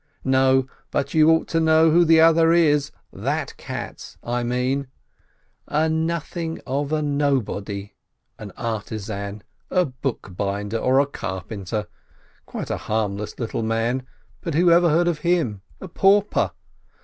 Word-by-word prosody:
No, 130 Hz, 0 st, +3 dB, 0.2 s
but 140 Hz, +1 st, -2 dB
you 155 Hz, 0 st, +5 dB
ought 160 Hz, 0 st, +3 dB
to 165 Hz, -, +1 dB
know 160 Hz, 0 st, +4 dB
who 175 Hz, +2 st, +5 dB
the 165 Hz, -1 st, +5 dB
other 165 Hz, 0 st, +5 dB
is, 150 Hz, -4 st, +3 dB, 0.2 s
that -, -, -3 dB
Katz, -, -, -7 dB
I 120 Hz, +1 st, -1 dB
mean! 125 Hz, +3 st, -1 dB, 0.8 s
A 155 Hz, +2 st, +1 dB
nothing 165 Hz, +1 st, -2 dB
of 140 Hz, +2 st, -2 dB
a 155 Hz, -1 st, 0 dB
nobody, 120 Hz, -9 st, -1 dB, 0.5 s
an 105 Hz, -2 st, -8 dB
artisan, 105 Hz, -2 st, -4 dB, 0.3 s
a 180 Hz, -1 st, +2 dB
bookbinder 105 Hz, -5 st, -3 dB
or 130 Hz, +3 st, +3 dB
a 140 Hz, -, +4 dB
carpenter, 100 Hz, -4 st, -5 dB, 0.6 s
quite -, -, -5 dB
a -, -, -1 dB
harmless 105 Hz, -1 st, -3 dB
little 115 Hz, -1 st, -3 dB
man, 115 Hz, +3 st, 0 dB, 0.4 s
but 165 Hz, -5 st, -3 dB
who 175 Hz, +2 st, +4 dB
ever 170 Hz, 0 st, +5 dB
heard 170 Hz, +3 st, +3 dB
of 170 Hz, -3 st, 0 dB
him? 150 Hz, -, 0 dB, 0.2 s
A 190 Hz, -, -8 dB
pauper! 200 Hz, +3 st, +3 dB
140 Hz, 135 wpm, -23 LUFS, 110-160 Hz, 0.8 s, you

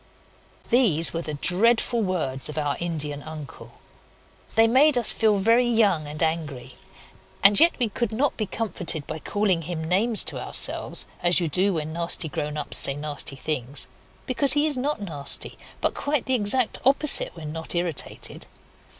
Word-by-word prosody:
These 200 Hz, -, +2 dB
were 165 Hz, -, -3 dB
the 155 Hz, -3 st, -6 dB
dreadful 230 Hz, -, +1 dB
words 155 Hz, -10 st, -2 dB
of 150 Hz, -, -8 dB
our 145 Hz, -2 st, -1 dB
Indian 150 Hz, -4 st, -4 dB
uncle. 155 Hz, -2 st, -11 dB, 0.8 s
They 225 Hz, +1 st, +5 dB
made 265 Hz, +4 st, +4 dB
us 240 Hz, -, +5 dB
feel 215 Hz, -2 st, +2 dB
very 230 Hz, +5 st, +3 dB
young 205 Hz, -10 st, +1 dB
and 150 Hz, +3 st, -4 dB
angry; 145 Hz, -6 st, -3 dB, 0.7 s
and 200 Hz, +3 st, +6 dB
yet 335 Hz, +2 st, +6 dB
we 245 Hz, -, 0 dB
could 225 Hz, +1 st, -3 dB
not 265 Hz, +6 st, -1 dB
be 215 Hz, -, -3 dB
comforted 180 Hz, -8 st, -4 dB
by 155 Hz, -, -6 dB
calling 195 Hz, -1 st, 0 dB
him 160 Hz, 0 st, -5 dB
names 205 Hz, +7 st, +1 dB
to -, -, -3 dB
ourselves, -, -, +2 dB, 0.2 s
as 175 Hz, 0 st, +4 dB
you 170 Hz, -, -1 dB
do 185 Hz, +5 st, +1 dB
when 155 Hz, 0 st, -4 dB
nasty 170 Hz, -1 st, -1 dB
grown 150 Hz, +1 st, -4 dB
ups 150 Hz, -, +3 dB
say 135 Hz, -, +2 dB
nasty 145 Hz, -1 st, -3 dB
things, 135 Hz, -1 st, -4 dB, 0.4 s
because 265 Hz, +1 st, +2 dB
he 295 Hz, +1 st, +3 dB
is 305 Hz, -2 st, +1 dB
not 270 Hz, +1 st, -2 dB
nasty, 155 Hz, -9 st, -1 dB, 0.3 s
but -, -, +1 dB
quite 285 Hz, -1 st, -1 dB
the 260 Hz, -, +3 dB
exact 240 Hz, +1 st, +1 dB
opposite 275 Hz, -2 st, +3 dB
when 155 Hz, -3 st, -8 dB
not 160 Hz, +1 st, -3 dB
irritated. 170 Hz, -4 st, -3 dB
180 Hz, 165 wpm, -24 LUFS, 155-230 Hz, 0.8 s, and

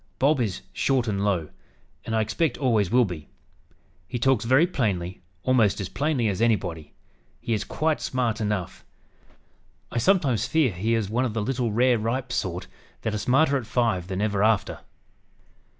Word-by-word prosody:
Bob 140 Hz, +3 st, +3 dB
is 95 Hz, -, -2 dB
'short 130 Hz, -3 st, +1 dB
and 100 Hz, -2 st, -1 dB
low,' 90 Hz, -7 st, 0 dB, 0.5 s
and 110 Hz, -, -2 dB
I 110 Hz, -, +3 dB
expect 115 Hz, +9 st, 0 dB
always 115 Hz, -9 st, +2 dB
will 125 Hz, +1 st, +4 dB
be. 85 Hz, -6 st, -7 dB, 0.8 s
He 125 Hz, -, -3 dB
talks 120 Hz, -2 st, +2 dB
very 130 Hz, +7 st, +5 dB
plainly, 95 Hz, -, -2 dB, 0.2 s
almost 115 Hz, -6 st, +3 dB
as 95 Hz, -3 st, -4 dB
plainly 140 Hz, -6 st, 0 dB
as 100 Hz, 0 st, -1 dB
anybody. 90 Hz, -9 st, 0 dB, 0.5 s
He 115 Hz, -, -2 dB
is 105 Hz, -, 0 dB
quite 155 Hz, 0 st, -1 dB
smart 120 Hz, -3 st, -1 dB
enough. 105 Hz, -4 st, -3 dB, 1.1 s
I -, -, -1 dB
sometimes 130 Hz, -, +2 dB
fear 150 Hz, -4 st, +2 dB
he 105 Hz, +6 st, 0 dB
is 110 Hz, -3 st, -1 dB
one 120 Hz, +3 st, +1 dB
of 120 Hz, -4 st, -2 dB
the 110 Hz, -, 0 dB
little 125 Hz, -1 st, -1 dB
rare 120 Hz, +2 st, +3 dB
ripe 125 Hz, +4 st, -2 dB
sort 90 Hz, -6 st, -2 dB, 0.4 s
that 110 Hz, -, -1 dB
are 105 Hz, -, -1 dB
smarter 140 Hz, +6 st, +3 dB
at 120 Hz, -5 st, -6 dB
five 110 Hz, -9 st, 0 dB
than 95 Hz, 0 st, -3 dB
ever 105 Hz, -2 st, +1 dB
after. 110 Hz, -2 st, +1 dB
115 Hz, 170 wpm, -25 LUFS, 100-130 Hz, 1.1 s, very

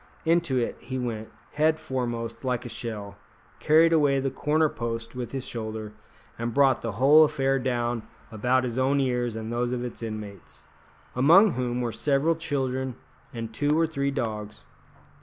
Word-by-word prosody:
Into 165 Hz, -5 st, +2 dB
it 120 Hz, -, -1 dB
he 130 Hz, -, -5 dB
went, 115 Hz, -3 st, -4 dB, 0.2 s
head 155 Hz, +2 st, +2 dB
foremost, 120 Hz, -5 st, -4 dB
like 125 Hz, -1 st, -1 dB
a -, -, -5 dB
shell, 110 Hz, -4 st, -6 dB, 0.4 s
carried 165 Hz, +2 st, +5 dB
away 145 Hz, -4 st, +3 dB
the 135 Hz, 0 st, -1 dB
corner 155 Hz, +3 st, +2 dB
post 115 Hz, -4 st, -5 dB
with 125 Hz, -1 st, -5 dB
his 135 Hz, -2 st, -4 dB
shoulder, 110 Hz, -3 st, -5 dB, 0.5 s
and 115 Hz, 0 st, -3 dB
brought 135 Hz, -2 st, +4 dB
the 115 Hz, -2 st, -3 dB
whole 140 Hz, +8 st, +6 dB
affair 135 Hz, -2 st, +1 dB
down 120 Hz, -2 st, -1 dB, 0.3 s
about 125 Hz, +4 st, +1 dB
his 125 Hz, 0 st, -2 dB
own 135 Hz, +2 st, +2 dB
ears 125 Hz, -3 st, 0 dB
and 110 Hz, +1 st, -5 dB
those 120 Hz, +1 st, -1 dB
of 125 Hz, 0 st, -2 dB
its 120 Hz, -, -8 dB
inmates, 105 Hz, -4 st, -8 dB, 0.5 s
among 170 Hz, -, +6 dB
whom 125 Hz, -3 st, -2 dB
were 120 Hz, -1 st, -1 dB
several 140 Hz, +7 st, +1 dB
children 130 Hz, -5 st, -2 dB, 0.4 s
and 115 Hz, -2 st, -6 dB
two 145 Hz, +6 st, +1 dB
or 165 Hz, -, +4 dB
three 140 Hz, -3 st, -1 dB
dogs. 110 Hz, -6 st, -4 dB
125 Hz, 165 wpm, -26 LUFS, 115-140 Hz, 0.5 s, whole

